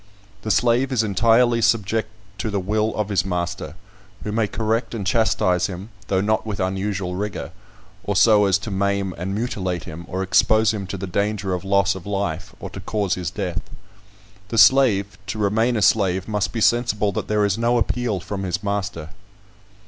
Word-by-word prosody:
The 110 - -5
slave 125 +4 +2
is 120 -4 +2
entirely 115 +4 +3
subject 110 0 +1 0.3
to 110 - -2
the 100 -1 -1
will 105 +3 -1
of 105 -1 -2
his 95 -3 +1
master, 85 -4 -3 0.5
who 105 - -3
may 110 0 +1
correct 115 +3 -1
and 105 -4 -4
chastise 95 -4 +2
him, 95 +2 -7 0.2
though 95 -1 +1
not 110 +2 +1
with 105 -3 -5
unusual 95 0 -2
rigour, 100 +2 -4 0.5
or 100 - -2
so 105 +1 +5
as 95 -1 +3
to 105 +1 -7
maim 100 -1 0
and 95 +3 -4
mutilate 95 -7 -2
him, 85 +2 -8
or 95 +3 -3
expose 110 +3 +3
him 100 -3 -4
to 100 - -5
the 95 - -4
danger 100 +1 -1
of 90 - -3
loss 100 0 +2
of 95 0 -9
life, 95 -4 -3
or - - -7
to - - -7
cause 100 0 -1
his 90 -2 -3
death. 95 -3 -3 0.9
The 115 - -4
slave, 110 -6 +4
to 100 - -4
remain 110 +3 +1
a 105 - +1
slave, 95 -3 +2
must 105 -3 -1
be 115 - -3
sensible 110 -3 +2
that - - -4
there 105 -1 +2
is 100 +2 0
no 120 +1 +2
appeal 120 -3 0
from 95 +3 -5
his 95 +1 -3
master." 100 -6 -3
100 Hz, 185 wpm, -22 LUFS, 95-110 Hz, 0.9 s, so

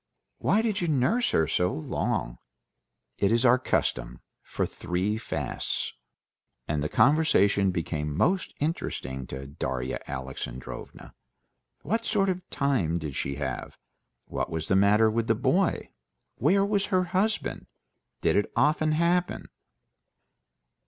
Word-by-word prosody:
"Why 220 - +2
did 215 -5 0
you 175 - 0
nurse 155 - +2
her 80 - +2
so 90 +1 +1
long?" - - -2 0.8
"It's 115 +5 +3
our 125 +1 +6
custom; 65 - -1 0.2
for - - -2
three 95 +5 -2
fasts...." - - -3 0.7
And 75 -1 -1
the 75 - -1
conversation 105 -10 +4
became 75 -4 -2
most 180 - +1
interesting 65 - -3
to 65 +1 -6
Darya 65 -2 -3
Alexandrovna. 65 -1 -7 0.7
What 225 +8 0
sort 200 -4 +1
of 185 -1 -3
time 125 - +1
did 75 -4 -5
she 70 +1 -2
have? 70 -3 -4 0.5
What - - -3
was 80 -1 -4
the 95 - +4
matter 105 +3 +5
with 115 +1 -1
the 115 - +3
boy? 140 - +1 0.4
Where 195 +1 +3
was 200 -1 0
her 185 -2 +2
husband? 195 +5 -1 0.5
Did - - +3
it 105 - +1
often 155 +1 +3
happen? 175 +3 +1
110 Hz, 125 wpm, -27 LUFS, -, 0.8 s, our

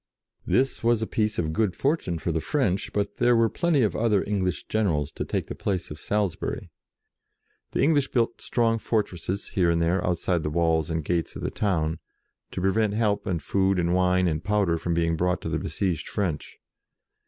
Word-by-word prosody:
This 135 -1 +1
was 115 -1 +3
a - - +1
piece 110 0 -1
of 80 -2 -1
good 100 -1 +1
fortune 135 - 0
for 85 - -2
the 80 0 -1
French, 100 - 0
but 100 0 -2
there 120 0 +4
were 115 -1 +4
plenty 165 -7 +2
of 105 - 0
other 110 -3 +2
English 95 -4 -1
generals 80 -9 0
to - - -4
take - - -2
the - - -6
place 95 -5 -3
of 75 - -7
Salisbury. 100 -1 -2 1.0
The - - +1
English 145 -2 +3
built 115 -2 0
strong 115 -1 +1
for 110 -1 +1
tresses 95 +2 -5
here 90 -3 +2
and 85 0 +2
there, 85 +2 +1
outside 90 0 0
the 75 - -2
walls 80 0 +1
and 80 -2 -2
gates 85 0 -1
of - - -6
the - - -1
town, 80 -6 0 0.5
to - - -5
prevent 105 +2 +1
help 105 -2 0
and 85 -4 -1
food 95 -1 +1
and 85 0 +1
wine 90 0 +3
and 80 0 -1
powder 100 -5 +1
from 85 0 -1
being 85 -1 +1
brought 90 +2 0
to - - -4
the - - -1
besieged 90 -5 -2
French. 90 -8 -3
95 Hz, 200 wpm, -26 LUFS, 85-110 Hz, 1.0 s, there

